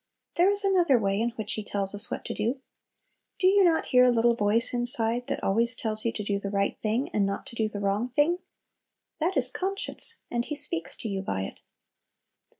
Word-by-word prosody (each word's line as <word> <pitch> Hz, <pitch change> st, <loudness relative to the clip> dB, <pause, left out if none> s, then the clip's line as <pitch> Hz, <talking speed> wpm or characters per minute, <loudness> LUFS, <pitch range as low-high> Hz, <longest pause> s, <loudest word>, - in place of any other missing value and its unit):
There 355 Hz, +3 st, +4 dB
is 405 Hz, +1 st, +2 dB
another 355 Hz, -9 st, +3 dB
way 200 Hz, -1 st, 0 dB
in 235 Hz, -, +1 dB
which 215 Hz, -1 st, -2 dB
He 215 Hz, -, -3 dB
tells 200 Hz, -1 st, 0 dB
us 205 Hz, +1 st, 0 dB
what -, -, -5 dB
to -, -, -3 dB
do. 235 Hz, +6 st, -2 dB, 0.8 s
Do 370 Hz, -, -1 dB
you 395 Hz, +1 st, +5 dB
not 335 Hz, -3 st, +2 dB
hear 250 Hz, 0 st, +5 dB
a 250 Hz, -, +5 dB
little 235 Hz, 0 st, +3 dB
voice 225 Hz, +2 st, +1 dB
inside 240 Hz, 0 st, +2 dB
that -, -, -4 dB
always 230 Hz, +4 st, +2 dB
tells 215 Hz, -1 st, -3 dB
you 230 Hz, -, +1 dB
to 210 Hz, -, -4 dB
do 200 Hz, 0 st, -1 dB
the 200 Hz, -, -5 dB
right 200 Hz, 0 st, -1 dB
thing, 225 Hz, +5 st, -1 dB
and 210 Hz, -, 0 dB
not 195 Hz, 0 st, -3 dB
to -, -, -10 dB
do 220 Hz, -1 st, 0 dB
the 205 Hz, -1 st, -6 dB
wrong 200 Hz, +5 st, -1 dB
thing? 295 Hz, +8 st, +1 dB, 0.8 s
That 340 Hz, +4 st, 0 dB
is -, -, +4 dB
conscience 395 Hz, +4 st, -1 dB
and 235 Hz, 0 st, -1 dB
He 300 Hz, -, -5 dB
speaks 275 Hz, -, -3 dB
to -, -, -6 dB
you 195 Hz, -2 st, -3 dB
by 95 Hz, -, -3 dB
it. -, -, -8 dB
230 Hz, 220 wpm, -27 LUFS, 205-290 Hz, 0.8 s, you